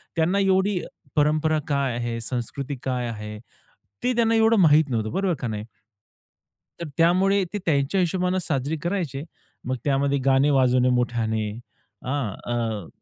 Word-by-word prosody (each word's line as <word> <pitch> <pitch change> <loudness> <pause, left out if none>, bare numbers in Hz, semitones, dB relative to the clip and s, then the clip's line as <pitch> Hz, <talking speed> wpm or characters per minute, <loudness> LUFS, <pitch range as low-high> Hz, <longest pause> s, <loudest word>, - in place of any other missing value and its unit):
त्यांना 170 +5 +2
एवढी 190 0 +2 0.4
परंपरा 155 +1 +2
काय 140 -4 0
आहे, 120 -1 -3
संस्कृती 130 +4 -4
काय 125 -2 -1
आहे, 105 -1 -6 0.7
ते 250 - +2
त्यांना 230 -1 +3
एवढं 225 0 +4
माहीत 155 -3 +5
नव्हतं 110 -3 -1
बरोबर 190 - 0
का 125 - -3
नाही? 105 -2 -4 1.2
तर 170 - -4
त्यामुळे 190 +4 +3
ते - - -1
त्यांच्या 145 +3 +1
हिशोबाने 180 +1 +1
साजरी 145 -1 -2
करायचे. 170 -7 -2 0.4
मग 130 - 0
त्यामध्ये 140 0 +1
गाणे 135 +1 +4
वाजवणे 130 -2 +3
मोठ्याने. 115 -3 0 0.6
हां, 130 -5 -1 0.2
अ, 110 -6 -2
140 Hz, 140 wpm, -24 LUFS, 125-180 Hz, 1.2 s, माहीत